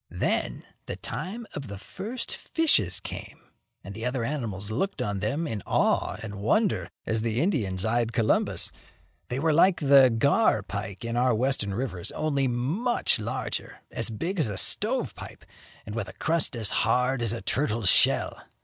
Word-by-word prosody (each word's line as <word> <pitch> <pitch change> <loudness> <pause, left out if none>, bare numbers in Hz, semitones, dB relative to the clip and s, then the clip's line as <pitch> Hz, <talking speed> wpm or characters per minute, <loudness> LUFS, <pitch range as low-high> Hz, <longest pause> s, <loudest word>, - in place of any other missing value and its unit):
Then, - - -1 0.2
the - - -3
time 225 +6 -5
of 145 - -6
the 100 -1 -7
first 225 - -5
fishes 105 - +2
came, - - -8 0.4
and 100 - -8
the 110 +3 -7
other 125 0 -1
animals 110 -7 -2
looked 170 - -2
on 105 -5 -1
them 140 - -1
in 110 -9 -3
awe - - +2
and 100 -2 -6
wonder 210 - +1 0.2
as 110 0 0
the 115 +1 0
Indians 115 - 0
eyed 115 +1 +1
Columbus. 115 -3 +1 0.6
They 125 - -2
were 155 +3 +2
like 175 +4 +5
the 140 -3 +7
gar 120 - +3
pike 100 +1 -6
in 115 0 -2
our 125 -1 +3
Western 110 -5 0
rivers, 110 -8 -3
only 140 -3 0
much 145 - 0
larger, 115 +5 -4
as - - -2
big 170 - -3
as 150 - +2
a 100 -2 -4
stove - - +2
pipe, - - -11 0.4
and 105 - -7
with 110 -3 -3
a - - -9
crust 160 -4 +1
as 110 -3 -2
hard 125 +3 +1
as 115 -3 +1
a 115 - -4
turtle's 115 -5 +1
shell. - - +3
120 Hz, 170 wpm, -27 LUFS, 105-145 Hz, 0.6 s, the